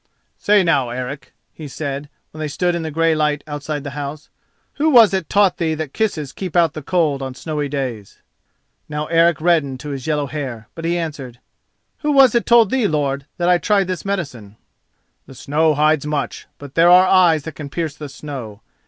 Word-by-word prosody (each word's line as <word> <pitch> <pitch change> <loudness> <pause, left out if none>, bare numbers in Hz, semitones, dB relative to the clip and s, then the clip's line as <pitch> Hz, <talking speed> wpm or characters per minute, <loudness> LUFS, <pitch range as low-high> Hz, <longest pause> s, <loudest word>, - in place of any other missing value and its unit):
"Say 205 -1 +4
now, 145 -8 +1
Eric," 125 +4 -6 0.2
he 155 - -9
said, 140 +1 -5 0.2
when 155 - -12
they 155 - -2
stood 175 +5 -1
in 170 - -2
the 160 - -4
grey 165 +1 +2
light 150 -1 0
outside 145 -1 -5
the 140 - -6
house, 145 +1 -7 0.5
"who 305 +2 +2
was 235 -8 +7
it 190 -4 -2
taught 200 -3 +3
thee 160 -2 -1
that 155 -3 -5
kisses 160 -11 -2
keep 185 -3 -6
out 170 -2 +3
the 155 - -6
cold 150 -3 0
on 130 -1 -5
snowy 150 -1 -4
days?" 125 -8 -5 0.7
Now 150 0 -3
Eric 165 +1 +3
reddened 155 -6 +1
to 150 - -7
his 135 -1 -6
yellow 150 -2 0
hair, 130 -7 -6
but 165 - -7
he 170 +1 0
answered: 145 -8 -6 0.6
"Who 295 -1 0
was 270 -4 +6
it 235 - +1
told 235 -4 +5
thee, 255 -5 +2
lord, 140 -3 -2
that 175 - 0
I 180 -1 +4
tried 200 0 +2
this 185 -2 -4
medicine?" 140 - -5 0.7
"The 135 - -13
snow 150 +4 +1
hides 150 0 +2
much, 150 -2 -3
but 140 -1 -11
there 170 +1 +5
are 180 +1 +7
eyes 175 -5 +4
that 160 - -7
can 145 -1 -8
pierce 160 0 -3
the 150 -1 -8
snow. 130 -7 -8
155 Hz, 200 wpm, -19 LUFS, 140-175 Hz, 0.7 s, was